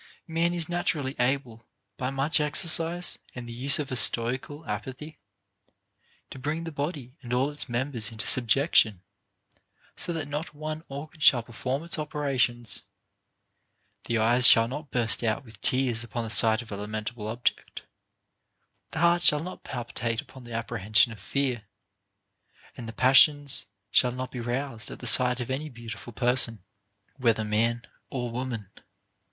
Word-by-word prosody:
Man 165 Hz, 0 st, 0 dB
is 170 Hz, -2 st, +1 dB
naturally 155 Hz, -6 st, -1 dB
able, 125 Hz, -3 st, -1 dB, 0.3 s
by 125 Hz, +4 st, -3 dB
much 135 Hz, +4 st, +3 dB
exercise 165 Hz, +3 st, +2 dB, 0.2 s
and 125 Hz, -1 st, -7 dB
the 120 Hz, -, -7 dB
use 135 Hz, +4 st, +3 dB
of 145 Hz, -3 st, -4 dB
a -, -, -1 dB
stoical 125 Hz, +6 st, +1 dB
apathy, 130 Hz, +8 st, -6 dB, 1.1 s
to 135 Hz, -, -9 dB
bring 150 Hz, +5 st, -3 dB
the 165 Hz, -, -6 dB
body 140 Hz, -3 st, -5 dB
and 120 Hz, -3 st, -9 dB
all 130 Hz, +4 st, +1 dB
its 145 Hz, -, -1 dB
mem 125 Hz, +4 st, -2 dB
bers 115 Hz, -3 st, -3 dB
into 110 Hz, -1 st, -4 dB
subjection, 120 Hz, -, +3 dB, 0.9 s
so -, -, -3 dB
that 160 Hz, -3 st, -4 dB
not 150 Hz, +2 st, -5 dB
one 155 Hz, +1 st, -5 dB
organ 145 Hz, +3 st, -9 dB
shall 125 Hz, -5 st, +5 dB
perform 130 Hz, +5 st, -4 dB
its 170 Hz, -1 st, -5 dB
operation, 135 Hz, -5 st, -1 dB, 0.7 s
— -, -, -48 dB
the 115 Hz, -, 0 dB
eyes 120 Hz, +3 st, +5 dB
shall 115 Hz, 0 st, +7 dB
not 145 Hz, +4 st, -7 dB
burst 120 Hz, -1 st, +1 dB
out 115 Hz, +4 st, -1 dB
with 110 Hz, -4 st, -16 dB
tears 125 Hz, -3 st, +1 dB
upon 120 Hz, 0 st, -4 dB
the 110 Hz, -, -6 dB
sight 110 Hz, +1 st, +3 dB
of 115 Hz, -, -15 dB
a 100 Hz, -, -4 dB
lamentable 110 Hz, +2 st, -5 dB
object, 115 Hz, +3 st, -2 dB, 1.1 s
the -, -, -3 dB
heart 170 Hz, 0 st, +4 dB
shall 150 Hz, -3 st, +5 dB
not 185 Hz, +2 st, -8 dB
palpi 120 Hz, -2 st, -7 dB
tate 115 Hz, -1 st, -2 dB
upon 130 Hz, -2 st, -10 dB
the 120 Hz, -, -11 dB
apprehension 110 Hz, -1 st, +2 dB
of 110 Hz, -, -10 dB
fear, 125 Hz, +1 st, -2 dB, 1.1 s
and 120 Hz, -, -8 dB
the -, -, -5 dB
passions 135 Hz, -, +4 dB, 0.2 s
shall 125 Hz, +3 st, +4 dB
not 130 Hz, +1 st, -6 dB
be 125 Hz, -, -6 dB
roused 120 Hz, -1 st, -3 dB
at -, -, -8 dB
the -, -, -10 dB
sight 125 Hz, 0 st, +5 dB
of 125 Hz, +1 st, -4 dB
any 150 Hz, +4 st, -3 dB
beautiful 120 Hz, -2 st, -9 dB
person, 120 Hz, -3 st, +1 dB, 0.5 s
whether 115 Hz, -4 st, +1 dB
man 115 Hz, +3 st, 0 dB, 0.2 s
or 120 Hz, -3 st, -3 dB
woman. 115 Hz, -5 st, -5 dB
125 Hz, 160 wpm, -27 LUFS, 115-145 Hz, 1.1 s, shall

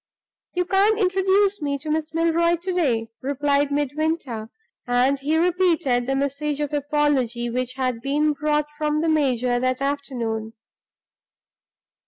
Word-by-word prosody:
"You 360 Hz, 0 st, +1 dB
can't 395 Hz, +4 st, +3 dB
introduce 385 Hz, 0 st, +2 dB
me 285 Hz, -1 st, -1 dB
to 305 Hz, +2 st, -5 dB
Miss 310 Hz, 0 st, -1 dB
Milroy 335 Hz, +1 st, +2 dB
to 360 Hz, +2 st, -4 dB
day," 235 Hz, -11 st, 0 dB
replied 285 Hz, +1 st, 0 dB
Midwinter; 290 Hz, -5 st, -2 dB, 0.4 s
and 250 Hz, +3 st, +2 dB
he 300 Hz, +4 st, 0 dB
repeated 335 Hz, -8 st, +2 dB
the 270 Hz, -, 0 dB
message 280 Hz, +2 st, -2 dB
of 295 Hz, 0 st, -2 dB
apology 280 Hz, -5 st, 0 dB
which 250 Hz, +1 st, -2 dB
had 255 Hz, -3 st, -2 dB
been 295 Hz, +3 st, +1 dB
brought 300 Hz, 0 st, 0 dB
from 300 Hz, 0 st, 0 dB
the 325 Hz, -, +1 dB
major 255 Hz, -5 st, +1 dB
that 255 Hz, 0 st, 0 dB
afternoon. 245 Hz, -6 st, -3 dB
290 Hz, 135 wpm, -23 LUFS, 255-320 Hz, 0.4 s, can't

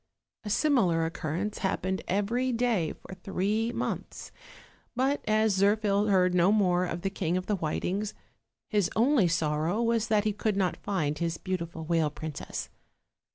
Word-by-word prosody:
A 210 Hz, -, -5 dB
similar 195 Hz, -, +2 dB
occurrence 165 Hz, +5 st, -3 dB
happened 190 Hz, -1 st, -1 dB
every 230 Hz, +7 st, 0 dB
day 230 Hz, -9 st, +1 dB
for -, -, -12 dB
three 200 Hz, +4 st, -1 dB
months; -, -, -4 dB, 0.6 s
but 265 Hz, +3 st, +1 dB
as 215 Hz, -1 st, +3 dB
Zirphil 205 Hz, +1 st, +2 dB
heard 185 Hz, -2 st, +3 dB
no 180 Hz, +2 st, +4 dB
more 185 Hz, -4 st, +3 dB
of 175 Hz, 0 st, -5 dB
the 195 Hz, -, -1 dB
King 180 Hz, -3 st, -1 dB
of 185 Hz, -, -3 dB
the 210 Hz, -, 0 dB
Whitings, 190 Hz, +5 st, -2 dB, 0.5 s
his 205 Hz, -4 st, +1 dB
only 235 Hz, -3 st, +4 dB
sorrow 160 Hz, +3 st, 0 dB
was 230 Hz, -1 st, +1 dB
that 215 Hz, -1 st, +2 dB
he 210 Hz, -1 st, 0 dB
could 210 Hz, 0 st, -1 dB
not 185 Hz, -4 st, +1 dB
find 155 Hz, -7 st, -2 dB
his 170 Hz, -1 st, -1 dB
beautiful 170 Hz, -3 st, -4 dB
whale 165 Hz, -2 st, +2 dB
princess. 150 Hz, 0 st, -6 dB
195 Hz, 155 wpm, -28 LUFS, 170-215 Hz, 0.6 s, no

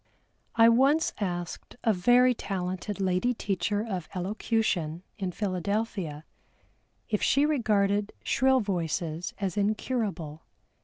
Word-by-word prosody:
I 230 Hz, 0 st, +7 dB
once 270 Hz, +7 st, +4 dB
asked 175 Hz, -4 st, -4 dB
a 225 Hz, -, +4 dB
very 245 Hz, +7 st, +5 dB
talented 190 Hz, -1 st, -4 dB
lady 190 Hz, +6 st, +1 dB
teacher 205 Hz, +1 st, -1 dB
of 185 Hz, -6 st, -4 dB
Elocution 185 Hz, -4 st, -1 dB, 0.2 s
in 190 Hz, -2 st, -2 dB
Philadelphia 185 Hz, -4 st, -2 dB, 0.8 s
if 210 Hz, -2 st, -1 dB
she 280 Hz, +2 st, +3 dB
regarded 210 Hz, -7 st, +1 dB
shrill 260 Hz, +1 st, +3 dB
voices 170 Hz, -3 st, -2 dB
as 195 Hz, -1 st, -3 dB
incurable. 200 Hz, -, -1 dB
200 Hz, 105 wpm, -28 LUFS, 180-225 Hz, 0.8 s, I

